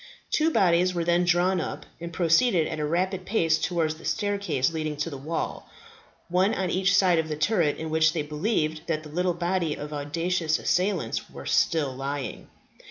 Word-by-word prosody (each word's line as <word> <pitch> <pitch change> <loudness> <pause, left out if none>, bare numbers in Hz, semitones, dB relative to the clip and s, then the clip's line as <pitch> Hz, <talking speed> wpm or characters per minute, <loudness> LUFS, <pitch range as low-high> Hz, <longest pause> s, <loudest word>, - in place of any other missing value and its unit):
Two 315 +1 +3
bodies 180 - +3
were 170 - 0
then 175 +1 +2
drawn 175 +1 +2
up, - - -5
and 170 0 -6
proceeded 170 +2 +3
at 155 - -4
a 150 - 0
rapid 185 +4 -1
pace 165 -6 +1
towards 165 -3 0
the 160 - -15
staircases 200 -9 0
leading 155 -2 -3
to 150 +3 -2
the - - -5
wall, 155 +5 -4 0.6
one 185 +4 +2
on 185 -2 -1
each 190 +1 +2
side 180 -4 +4
of 160 0 -2
the 155 - -2
turret 160 -2 +1
in 160 0 -5
which 160 0 +4
they 155 - -1
believed 155 0 -1
that 155 -2 -1
the 155 - -10
little 175 +3 0
body 175 -2 -1
of 150 +1 -7
audacious 160 +3 -1
assailants 180 - -1
were - - -10
still 150 -5 +1
lying. 140 +1 -5
170 Hz, 185 wpm, -26 LUFS, 155-185 Hz, 0.6 s, side